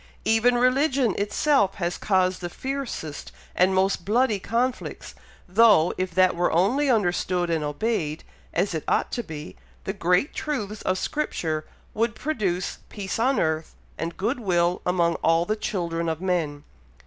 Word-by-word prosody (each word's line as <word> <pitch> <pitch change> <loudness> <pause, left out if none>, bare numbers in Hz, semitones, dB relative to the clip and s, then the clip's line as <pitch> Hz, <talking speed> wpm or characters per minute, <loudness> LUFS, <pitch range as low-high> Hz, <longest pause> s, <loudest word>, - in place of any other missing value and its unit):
Even 225 +2 +4
religion 255 -1 +2
itself 205 0 +2
has 175 -1 -2
caused 185 -2 +1
the 175 - -4
fiercest 260 - -5 0.2
and 185 +1 +3
most 190 -1 +1
bloody 215 +2 +2
conflicts, 240 +5 -2 0.3
though, 195 -3 +5
if 185 0 -2
that 185 -1 +4
were 175 +1 +1
only 245 - +2
understood 180 -5 +1
and 160 -2 0
obeyed 155 0 -2 0.3
as 185 +2 0
it 160 - -3
ought - - +1
to 240 - -2
be, 155 -6 -8 0.3
the 195 - -3
great 180 - +1
truths 215 -9 -3
of 185 - 0
Scripture 160 - -2 0.3
would 225 +1 0
produce 205 - -2
peace 200 0 -4
on 260 +4 +2
earth, 160 0 -1 0.2
and 165 +1 -5
good 235 +6 -1
will 175 -4 +1
among 170 -2 +2
all 165 +1 +2
the 215 - 0
children 170 -6 -2
of 160 -1 -2
men." 170 -6 -1
190 Hz, 150 wpm, -25 LUFS, 170-230 Hz, 0.3 s, though